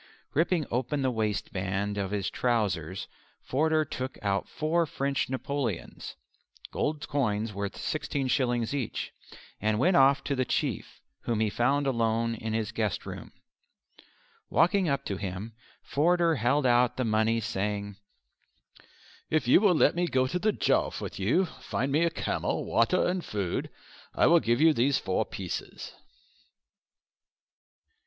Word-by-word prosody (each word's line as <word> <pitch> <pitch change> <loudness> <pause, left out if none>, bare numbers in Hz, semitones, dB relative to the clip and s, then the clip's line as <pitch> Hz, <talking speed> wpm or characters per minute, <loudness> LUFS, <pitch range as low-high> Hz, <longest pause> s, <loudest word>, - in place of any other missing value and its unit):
Ripping 165 +1 +2
open 130 +4 -1
the 130 - +2
waistband 100 -2 -2
of 95 -1 -2
his 100 -1 -2
trousers, 95 -8 -1 0.4
Forder 155 +3 +1
took 130 0 -5
out 100 -1 0
four 165 +2 0
French 140 -1 -1
Napoleons 130 -6 -4 0.6
(gold 150 0 -2
coins 110 -6 -1
worth 100 0 -4
16s. 130 -5 -1
each) 135 -6 -3 0.5
and 105 +1 +1
went 175 - +3
off 135 +1 +5
to 140 - -1
the 130 - +1
Chief, - - -2 0.3
whom 115 -2 0
he 110 -2 +1
found 140 +6 +1
alone 115 -2 +1
in 110 -1 -4
his 110 -1 -1
guest 110 -3 -2
room. - - -8 1.2
Walking 180 +1 +3
up 140 - -1
to 100 - -3
him 100 +3 -5 0.3
Forder 170 +1 +2
held 130 +4 +2
out 120 -1 +3
the 130 - 0
money 110 +1 +2
saying, 105 -2 -3 1.3
"If 155 -5 +1
you 130 - +6
will 200 -5 +4
let - - +4
me 175 +1 0
go 130 -5 +2
to 180 +8 -2
the 215 +3 +2
Jowf - - +1
with - - -6
you, 125 - +2
find 140 -4 -4
me 165 +4 +3
camel, 160 - -2
water 115 +11 +2
and 180 0 -1
food, 100 -4 -3 0.5
I - - +4
will 170 0 +6
give 120 -3 +1
you 160 +1 +6
these 135 +1 +2
four - - -1
pieces." - - -6
125 Hz, 140 wpm, -28 LUFS, 110-150 Hz, 1.3 s, you